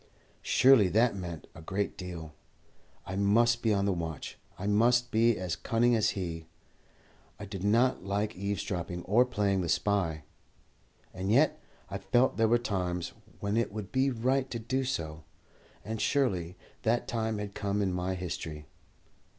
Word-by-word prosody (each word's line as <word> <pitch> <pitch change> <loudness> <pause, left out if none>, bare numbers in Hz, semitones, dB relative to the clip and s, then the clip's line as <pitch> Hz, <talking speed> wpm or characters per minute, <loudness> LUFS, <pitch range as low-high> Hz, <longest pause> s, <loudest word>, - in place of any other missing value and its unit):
Surely 130 -6 +5
that 115 +3 +3
meant 85 -4 -6
a 80 - -11
great 100 +5 -2
deal! 85 -5 -7 0.7
I 95 - -5
must 115 +4 +3
be 110 - +2
on 100 -1 +2
the 100 - +2
watch. 80 -3 -5 0.2
I 100 - -5
must 120 +4 +3
be 115 0 +3
as 90 -3 -2
cunning 120 +1 +2
as 110 -2 +1
he. 85 -3 -4 0.9
I - - -6
did 95 -1 -6
not 115 +2 +3
like 100 +2 -1
eavesdropping 90 -2 -3
or 115 +6 +4
playing 100 -6 0
the 85 - -3
spy, 90 -4 0 0.9
and 95 +2 -2
yet 140 +7 +3 0.3
I 100 0 -5
felt 120 +7 +2
there 115 0 +4
were 120 +2 +4
times 90 -7 -2 0.3
when 100 +1 -1
it 115 -2 +1
would 105 -2 -6
be 135 +1 +2
right 130 +2 0
to 120 - -3
do 130 +4 -1
so, 80 - -3 0.6
and 110 0 -4
surely 95 - 0 0.2
that 120 +2 +1
time 110 -2 -1
had 105 -1 -5
come 100 0 -1
in 95 -3 0
my 90 +1 -1
history. 80 -4 -5
100 Hz, 160 wpm, -30 LUFS, 90-115 Hz, 0.9 s, Surely